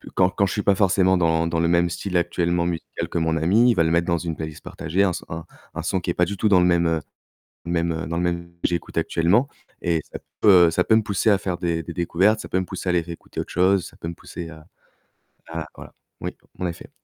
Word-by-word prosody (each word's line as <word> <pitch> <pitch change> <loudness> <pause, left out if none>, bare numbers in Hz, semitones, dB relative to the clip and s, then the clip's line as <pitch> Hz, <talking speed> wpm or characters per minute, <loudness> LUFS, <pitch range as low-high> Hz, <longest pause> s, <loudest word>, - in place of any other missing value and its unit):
quand 95 -1 +4
quand 100 - +1
je 95 - -2
suis 105 - -1
pas 100 - +4
forcément 95 -1 +3
dans 85 -1 +2
dans 85 -1 -1
le 85 - +2
même 85 0 +3
style 90 +2 -5
actuellement 85 0 0
musical 85 -2 -4
que - - -3
mon 80 -1 +1
ami, 105 +10 +4
il - - 0
va 85 - +3
le 80 - +1
mettre 85 +1 +2
dans 85 -1 +2
une 80 -2 -4
playlist 80 -1 -7
partagée, 90 +5 -1
un 95 - +2
s 85 - -5
un 80 +1 -6 0.3
un - - -4
son 95 - 0
qui 85 - -4
est - - +1
pas 90 - +2
du 100 +3 -4
tout 105 - +2
dans 95 -3 +6
le 90 - +4
même, 85 -1 +3
heu, 80 -1 +1 0.7
même, 85 -1 0
heu, 80 -2 -4
dans 85 - -3
le 90 - 0
même 85 0 -2
que - - +2
j'écoute 85 -2 -4
actuellement 95 +11 +2 0.4
et 85 -2 +1
ça - - -5 0.2
peut 90 -5 +7
ça 90 - +2
peut 110 - +3
me 110 - +3
pousser 105 +1 +1
à 100 - +4
faire 90 -2 -3
des 85 -1 -1
des 85 - -6
découvertes, 95 +5 +2
ça - - -8
peut 95 - +1
me - - -2
pousser 95 - -6
à - - +3
aller 90 -1 +3
réécouter 85 0 -10
autre - - -6
chose, 95 +1 +3
ça - - -13
peut 80 - -6
me 85 - -5
pousser 85 0 -8
à 80 -1 -13 0.8
à 80 -1 -5
voilà, - - -12 0.3
oui, - - -4 0.2
en 90 - -2
effet. 85 - -7
85 Hz, 270 wpm, -23 LUFS, 85-95 Hz, 0.8 s, peut